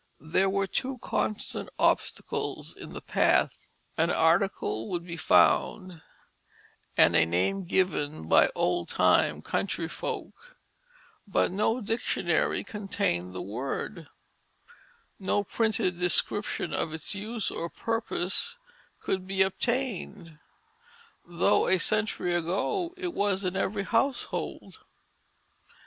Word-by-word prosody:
_ 160 - -13
_There 190 +2 +3
were 195 0 +1
two 255 +6 -2
constant 215 -2 -1
obstacles - - 0
in - - -10
the - - -7
path: - - +1 0.3
An 165 +1 +3
article 165 - +1
would 175 -1 -3
be 170 -1 -6
found 180 +1 +3 1.0
and - - +6
a 80 - +6
name 90 - 0
given 155 - 0
by - - +6
old 85 -1 0
time - - +3
country 170 -4 -2
folk, 485 - -6 0.7
but 195 - +1
no 215 +5 +1
dictionary 225 +3 0
contained 90 - -2
the - - -4
word, 135 - -5 1.1
no 200 +1 +1
printed 215 -4 0
description 180 +3 0
of 160 - -1
its 160 +3 -3
use 215 +2 -3
or 170 - -4
purpose 225 - -1 0.4
could 185 -1 -2
be 190 0 +3
obtained, 195 - -3 0.9
though 170 0 +2
a 190 - +4
century 215 -2 0
ago 195 - -1
it 360 -2 -3
was 200 - 0
in 180 0 -1
every 195 +1 -1
household. 230 +7 -2
190 Hz, 115 wpm, -28 LUFS, 165-215 Hz, 1.1 s, and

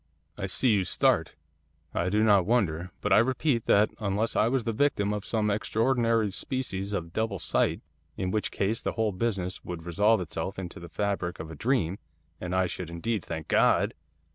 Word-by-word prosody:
'I - - -3
see 130 - +1
you 100 -2 +2
start, - - +1 0.6
I 85 - 0
do 105 +3 +2
not 100 -4 +4
wonder. 90 -7 +1
But - - +2
I - - +7
repeat 130 +1 +1
that 105 +1 +4
unless 105 +2 -1
I 110 - +4
was 130 0 +1
the 115 - -1
victim 105 -5 +1
of 105 -2 -3
some 105 -2 0
extraordinary 115 0 +1
species 100 -5 -3
of 85 -4 -3
double 110 -3 -1
sight 85 - 0 0.4
in 90 0 -1
which 105 +1 0
case 105 +4 -1
the - - -2
whole 110 -2 0
business 95 -2 -2
would 85 -2 -6
resolve 105 +6 +3
itself 85 +3 -4
into 90 -2 -6
the 85 0 -10
fabric 95 0 -2
of 80 0 -7
a - - -7
dream, 105 - 0 0.4
and 90 0 -3
I 95 0 +3
should 90 -1 -5
indeed 100 +5 -2
thank 80 -2 -6
God! - - +3
100 Hz, 190 wpm, -28 LUFS, 90-115 Hz, 0.6 s, I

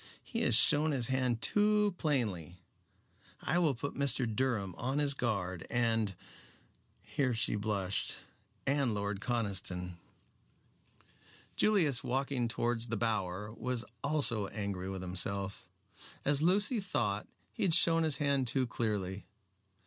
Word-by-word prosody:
He - - -4
has 115 - +4
shown 150 +6 +5
his 125 -3 -1
hand 130 -3 0
too 210 -1 +3
plainly. 105 - -1 0.8
I 175 - 0
will 155 -6 +2
put 140 +5 -5
Mr. 135 -2 0
Durham 110 -4 -1
on 130 +3 -3
his 145 -1 +3
guard, 100 -9 -3
and" 115 -4 0 0.9
here 130 -5 -1
she 115 - +2
blushed 100 -2 -1 0.5
"and 135 -5 +1
Lord 100 -1 -3
Conniston." 95 -7 -2 1.6
Julius, 165 - +2
walking 130 -1 -1
towards 120 0 -1
the 115 -1 -2
Bower, 105 -2 -2
was 125 0 -3 0.2
also 135 -9 +3
angry 100 -3 -4
with 95 -1 -5
himself. 95 +1 -3 0.6
As 145 0 +3
Lucy 205 +8 +3
thought, 110 - -1 0.3
he - - -7
had 170 -4 +5
shown 165 -1 +5
his 160 -3 +2
hand 140 -3 +1
too 130 +2 +2
clearly. 100 -5 -3
120 Hz, 125 wpm, -32 LUFS, 100-140 Hz, 1.6 s, shown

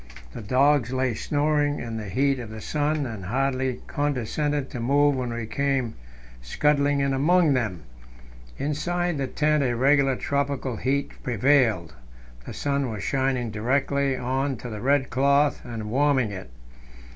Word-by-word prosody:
The - - -7
dogs 130 +3 +2
lay 130 -2 0
snoring 145 +3 0
in 115 -1 -5
the 105 -3 -6
heat 135 +6 +1
of 120 -3 -7
the 110 0 -8
sun, 150 +4 -1
and 110 -6 -6
hardly 130 +3 -1
condescended 145 +1 -1
to 125 - -5
move 140 +4 +3
when 125 -2 -3
we 115 -1 -4
came 135 -1 -1 0.5
scudding 145 - +1
in 140 0 +1
among 155 +3 +3
them. 105 - -2 0.7
Inside 175 +3 -1
the 135 - -1
tent 150 +3 +1
a 120 -2 0
regular 135 +1 +3
tropical 140 -3 -2
heat 135 +5 -1
prevailed; 120 - +2 0.5
the - - -6
sun 140 -2 -1
was 105 -3 -5
shining 130 -4 0
directly 135 +4 0
on 130 +2 -1
to 120 +2 -8
the 105 -1 -6
red 135 +2 +1
cloth 140 +2 +2
and 110 -3 -6
warming 135 -4 +2
it. 95 -7 -8
135 Hz, 150 wpm, -25 LUFS, 120-145 Hz, 0.7 s, move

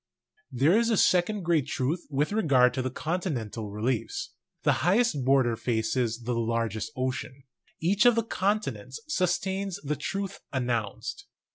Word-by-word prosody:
There 140 +9 +3
is 230 +1 +3
a 220 - +2
second 185 +3 +3
great 160 -5 +2
truth 145 +6 -2
with 145 +3 0
regard 140 -12 +4
to 130 - -1
the 130 - -2
con 165 +7 -2
tinental 115 - -4
reliefs: 130 - -2 0.3
the - - +4
highest 195 - +2
border 130 -3 +3
faces 115 +1 -1
the 120 +2 -1
largest 115 +1 -1
ocean. 130 +1 -3 0.4
Each 200 +7 +3
of 240 - +6
the 230 - +2
continents 185 - -2
sustains 190 - 0
the 150 +1 -1
truth 195 +5 -4
announced. 120 -6 -3
140 Hz, 145 wpm, -28 LUFS, 120-190 Hz, 0.4 s, of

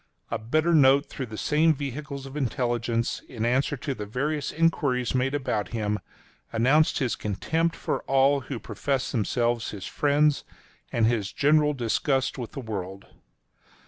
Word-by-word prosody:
A 115 - -1
bitter 155 +10 +1
note 140 -1 +6
through 130 -4 -5
the 110 -1 -8
same 155 +5 +3
vehicles 140 0 -5
of 135 +1 -9
intelligence 120 -3 -1
in 115 -3 -3
answer 130 +4 +1
to 140 +2 -3
the 105 -5 -6
various 145 +6 -2
enquiries 145 -6 +1
made 130 +2 +1
about 125 -7 -1
him, 105 -1 -1 0.5
announced 135 +7 +3
his 125 -6 0
contempt 160 - -1
for - - -2
all 135 +1 +4
who 135 -1 -6
professed 130 +2 -2
themselves 120 0 0
his 100 -3 -7
friends, 145 0 +2 0.5
and 115 -2 +2
his 110 -4 0
general 150 0 +3
disgust 135 +3 0
with 120 - -6
the 135 - -5
world. 100 -4 -6
130 Hz, 150 wpm, -26 LUFS, 115-145 Hz, 0.5 s, note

